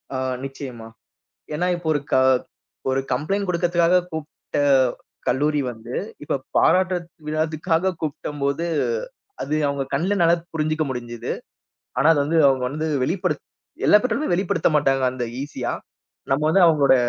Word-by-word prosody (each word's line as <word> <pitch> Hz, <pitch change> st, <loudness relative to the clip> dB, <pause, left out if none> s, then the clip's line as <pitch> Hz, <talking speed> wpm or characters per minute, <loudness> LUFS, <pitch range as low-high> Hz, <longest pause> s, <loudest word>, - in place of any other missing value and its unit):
ஆ -, -, 0 dB, 0.3 s
நிச்சயமா. 130 Hz, -4 st, -7 dB, 0.7 s
ஏன்னா 180 Hz, +4 st, 0 dB
இப்ப 175 Hz, -2 st, -7 dB
ஒரு 145 Hz, -, 0 dB
க -, -, +4 dB, 0.8 s
ஒரு 130 Hz, +1 st, +1 dB
கம்ப்ளைண்ட் 195 Hz, +10 st, 0 dB
குடுக்கத்துக்காகக் 175 Hz, +1 st, +2 dB
கூப்புட 160 Hz, -1 st, -6 dB, 0.7 s
கல்லூரி 150 Hz, +2 st, +2 dB
வந்து 115 Hz, +1 st, -8 dB, 0.3 s
இப்ப 145 Hz, -, -2 dB, 0.2 s
பாராட்றத் 185 Hz, -2 st, +3 dB, 0.3 s
விழக்காகக் 160 Hz, +3 st, +1 dB
கூப்டம் 150 Hz, -1 st, -4 dB
போது 140 Hz, +4 st, 0 dB, 0.8 s
அது 150 Hz, -, -2 dB
அவங்க 140 Hz, -1 st, -1 dB
கண்ணுல 185 Hz, +8 st, +1 dB
நல்லா 170 Hz, +1 st, +5 dB, 0.2 s
புரிஞ்சுக்க 155 Hz, 0 st, 0 dB
முடிஞ்சுது. 120 Hz, -2 st, -4 dB, 0.7 s
ஆனா 135 Hz, -, +3 dB
அது 150 Hz, -, +2 dB
வந்து 165 Hz, +2 st, +1 dB
அவங்க 130 Hz, -1 st, +1 dB
வந்து 155 Hz, +3 st, -3 dB, 0.2 s
வெளிப்படுத் 175 Hz, 0 st, -1 dB, 0.4 s
எல்லா 210 Hz, -, +8 dB
பெற்றோருமே 280 Hz, +4 st, 0 dB
வெளிப்படுத்தமாட்டாங்க 150 Hz, -7 st, +2 dB
அந்த 125 Hz, -1 st, -3 dB, 0.2 s
ஈசியா. 135 Hz, -4 st, -3 dB, 0.6 s
நம்ம 135 Hz, +3 st, +2 dB
வந்து 190 Hz, +3 st, +5 dB
அவங்களோட 145 Hz, -4 st, +5 dB
155 Hz, 130 wpm, -23 LUFS, 135-175 Hz, 0.8 s, எல்லா